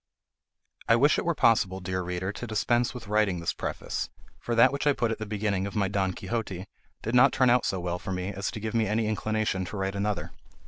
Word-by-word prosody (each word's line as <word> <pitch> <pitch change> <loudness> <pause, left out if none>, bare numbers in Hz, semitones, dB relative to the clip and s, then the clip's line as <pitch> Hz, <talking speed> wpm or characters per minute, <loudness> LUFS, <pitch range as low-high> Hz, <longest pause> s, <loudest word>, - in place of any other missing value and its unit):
I 115 - +7
wish 140 +6 +4
it - - -3
were 170 -1 +1
possible, 100 -7 +3
dear 95 0 -2
reader, 90 +2 -3
to 120 +3 -7
dispense 120 +2 +1
with 120 -4 -8
writing 105 -4 +2
this 85 - -1
preface; - - -4 0.3
for 120 - -2
that 125 +3 +6
which 140 +1 -1
I 145 - +5
put 115 -4 0
at 110 - -3
the 110 - -5
beginning 100 -2 -1
of 100 - -8
my 100 -2 +2
"Don 95 -1 0
Quixote" 100 -2 -4 0.4
did 115 - -3
not 125 +2 +6
turn 130 -2 +4
out 125 0 +3
so 95 - -1
well 90 0 -3
for 95 - -6
me 90 +1 -2
as 100 0 -3
to - - -6
give 110 +1 -4
me 115 -2 +2
any 110 +2 +1
inclination 110 -2 -1
to 100 - -6
write 95 0 -1
another. 100 -1 -2
105 Hz, 235 wpm, -27 LUFS, 95-115 Hz, 0.4 s, I